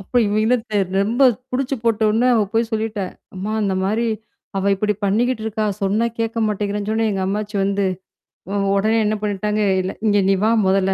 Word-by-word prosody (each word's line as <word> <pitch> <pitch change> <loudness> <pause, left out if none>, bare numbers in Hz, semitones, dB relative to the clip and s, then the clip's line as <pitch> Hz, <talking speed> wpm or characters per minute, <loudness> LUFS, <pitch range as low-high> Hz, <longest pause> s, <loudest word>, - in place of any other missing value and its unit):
அப்ப 195 - -15
இவங்க 205 +1 0
என்ன 250 +2 +4
தெர் 195 -3 0
ரொம்ப 235 +7 +1 0.3
புடிச்சு 265 +1 -1
போட்டோன 225 +2 +2
அவ 220 - +3
போய் 225 0 +1
சொல்லிட்டேன். 215 -3 -2 0.2
"அம்மா 195 +3 -4
இந்தமாரி. 200 +4 0 0.5
அவ 195 +1 +1
இப்பிடி 210 +1 0
பண்ணிக்கிட்டு 225 +4 +1
இருக்கா! 215 0 -1 0.2
சொன்னா 210 +4 +2
கேட்க 225 0 -2
மாட்டேங்கிறேன்னு" 205 0 -2
சொன்னோன 220 0 +1
எங்க 190 -1 -2
அம்மாச்சி 210 +1 -3
வந்து. 200 0 0 0.7
உ - - -3 0.2
உடனே 220 +3 +2
என்ன 215 +1 +1
பண்ணிட்டாங்க, 210 +1 -1 0.2
இல்ல 185 +1 -3 0.2
"இங்க 205 - +3
நீ 195 - +4
வா! 220 - +4 0.2
முதல்ல. 190 0 +2
210 Hz, 175 wpm, -20 LUFS, 195-225 Hz, 0.7 s, என்ன